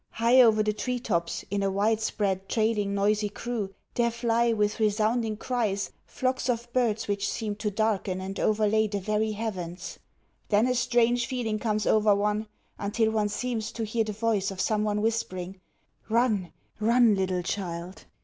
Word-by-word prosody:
High 235 +3 +5
over 220 -3 +5
the 215 0 0
tree 250 +4 -2
tops, 170 -7 -2
in 200 0 0
a 195 - +1
widespread, 200 -1 0
trailing, 215 -3 +1
noisy 210 +1 +1
crew, 225 -3 -4 0.2
there 235 -1 +2
fly, 235 0 +1
with 210 -1 0
resounding 215 +1 +1
cries, 215 -5 -1 0.2
flocks 260 0 -1
of 240 0 -2
birds 230 -4 +1
which 205 0 -1
seem 215 -2 -3
to 210 0 -1
darken 205 -3 0
and 190 +1 -5
overlay 215 0 +2
the 205 -1 -3
very 215 +2 0
heavens. 190 -5 -5 0.5
Then 210 +2 +4
a 255 - +2
strange 240 -1 +2
feeling 225 -4 -2
comes 215 -2 -1
over 210 -1 +4
one, 210 +2 0 0.3
until 220 +2 +1
one 215 -1 +1
seems 225 0 -3
to 225 - -3
hear 225 +1 0
the 215 - -4
voice 210 -2 0
of 195 -1 -7
some 210 +1 +1
one 210 0 0
whispering: 190 -5 -2 0.5
"Run, 220 -6 +1 0.3
run, 230 +1 +4
little 185 -2 0
child! 180 -1 -5
215 Hz, 165 wpm, -27 LUFS, 200-230 Hz, 0.5 s, High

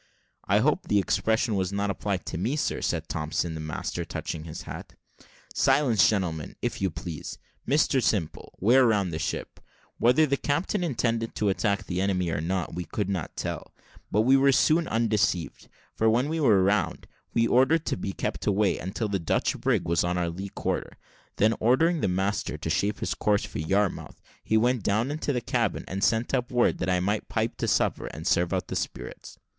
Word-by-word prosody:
"I - - +3
hope - - +1
the 105 - +2
expression 110 +3 +1
was 95 -2 0
not 100 0 -1
applied 100 0 -3
to - - -4
me, 115 +10 0
sir," 150 - -1
said - - -1
Thompson, 80 +2 -2
the 80 - -6
master, 75 -1 -4
touching 80 -1 -5
his 80 - -7
hat. - - -9 0.6
"Silence, 115 -9 +4
gentlemen, 85 -7 -2
if - - -3
you 95 - +2
please. 80 -1 -7 0.3
Mr 140 -2 +3
Simple, 95 -9 -1
wear 125 +5 +5
round 100 -6 +1
the 80 - -3
ship." 80 - -4 0.4
Whether 125 +7 +5
the 140 -1 0
captain 165 +8 -1
intended 115 -7 -1
to 105 - +1
attack 100 0 0
the 90 0 -2
enemy 90 -3 0
or 80 - -1
not, 90 +1 -2
we 90 +2 -3
could 100 -3 -3
not 95 -6 -4
tell, - - -5 0.4
but 105 - +3
we 130 +4 +5
were 135 0 +5
soon 160 +5 +3
undeceived; 110 -6 0 0.3
for 110 - +3
when 125 +6 +2
we 160 +1 -1
were 105 -10 +4
round, 100 +3 0 0.3
he 115 - +4
ordered 135 +7 +4
her - - -34
to - - -1
be 95 +2 -3
kept - - -4
away, 100 0 +2
until 95 +4 -3
the 100 -2 -1
Dutch 85 - 0
brig - - +1
was 85 0 +2
on 90 0 -1
our 85 -1 0
lee 95 +4 -6
quarter: - - -3 0.4
then 110 +2 +3
ordering 155 +9 +3
the - - +2
master 95 -2 -1
to 80 +1 -3
shape 105 +5 0
his - - -1
course 105 -1 +1
for - - -6
Yarmouth, 95 +5 -1 0.2
he 110 - +2
went 120 +1 +2
down 110 +7 0
into 150 -1 -2
the 125 -3 -1
cabin, - - -1
and 95 +1 -3
sent 115 +2 +1
up 125 -2 0
word 120 -1 +2
that 90 - -1
I 90 -1 +2
might 100 +4 -1
pipe - - -1
to - - -2
supper, - - +1
and 80 - -8
serve 85 -1 +2
out - - -1
the - - -5
spirits. - - -6
105 Hz, 200 wpm, -27 LUFS, 90-120 Hz, 0.6 s, wear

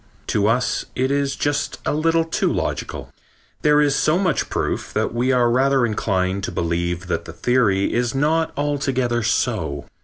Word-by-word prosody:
To 105 -1 +2
us 125 +3 0
it 130 +1 0
is 140 -1 0
just 145 0 -1
a - - +1
little 165 +2 +2
too 165 - 0
logical. - - -3 0.5
There 150 -1 +4
is 145 -2 +3
so 155 +3 +2
much 185 -5 0
proof - - -2
that - - -1
we 125 +2 +1
are 125 -2 +3
rather 135 0 +3
inclined 100 -3 -1
to - - -5
believe 85 +1 -2
that 85 -2 -2
the 80 - -9
theory 100 -2 +1
is 120 +1 0
not 160 +3 +1
altogether 135 -4 0
so. 105 - -1
130 Hz, 165 wpm, -21 LUFS, 105-145 Hz, 0.5 s, There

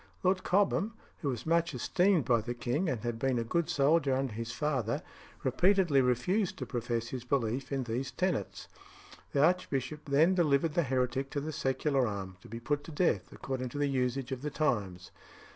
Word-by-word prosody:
Lord 185 0 +2
Cobham, 205 +3 +2 0.2
who 145 - -1
was 125 -4 -4
much 165 -2 +1
esteemed 180 - +2
by 120 -2 +3
the 120 +2 -4
king, 125 +9 -1
and 120 -5 -2
had 120 0 -3
been 130 0 +1
a 115 - 0
good 170 +8 0
soldier 145 -2 +3
under 130 -3 -1
his 115 +2 -4
father, 120 -2 -1 0.4
repeatedly 170 +2 +3
refused 130 - +1
to - - -4
profess 115 -2 -2
his 130 -2 -5
belief 125 0 -1
in 135 -1 0
these 125 +3 -3
tenets. 180 - -2 0.6
The 140 - +3
archbishop 150 -4 -1
then 155 +6 +4
delivered 155 -3 +2
the 170 - +3
heretic 130 -1 0
to 145 - -2
the 155 +2 -4
secular 135 -1 +1
arm, 95 -3 -5
to - - -14
be 115 +2 -6
put 145 +5 -1
to - - -8
death, 145 - +1
according 130 -1 -4
to 130 - -7
the 145 -1 +1
usage 130 -1 -1
of 130 -1 -3
the 150 - -2
times. 100 - -1
135 Hz, 190 wpm, -31 LUFS, 120-155 Hz, 0.6 s, then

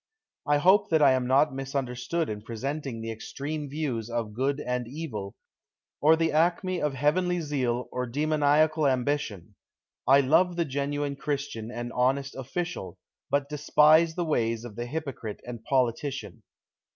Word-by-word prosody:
I 145 0 +4
hope 190 +7 +4
that 160 -2 +4
I 140 - +7
am 130 -1 +1
not 135 +3 +4
misunderstood 135 +4 -2
in 105 -1 -5
presenting 125 +2 -4
the 115 0 -4
ex 110 - -8
treme 145 +1 -3
views 135 -7 -3
of 115 -3 -3
good 135 +5 0
and 125 -3 -2
evil, 120 -9 -6 0.7
or 155 +2 +6
the 165 0 +1
acme 175 +3 +1
of 150 -2 0
heavenly 180 +6 +1
zeal 130 -6 -1
or 125 0 -2
demoniacal 150 +2 +2
ambition! 125 - -1 0.5
I 135 +2 +7
love 170 +6 +3
the 170 -1 0
genuine 140 0 -2
Christian 140 -6 -3
and 120 0 -5
honest 135 +3 +1
official, 135 - -4 0.3
but 140 0 +1
despise 150 +2 +4
the 175 - -1
ways 115 -6 0
of 115 -4 -9
the 120 +2 -4
hypocrite 135 -7 -5
and 120 -2 -7
politician. 130 -1 -1
140 Hz, 150 wpm, -27 LUFS, 120-155 Hz, 0.7 s, I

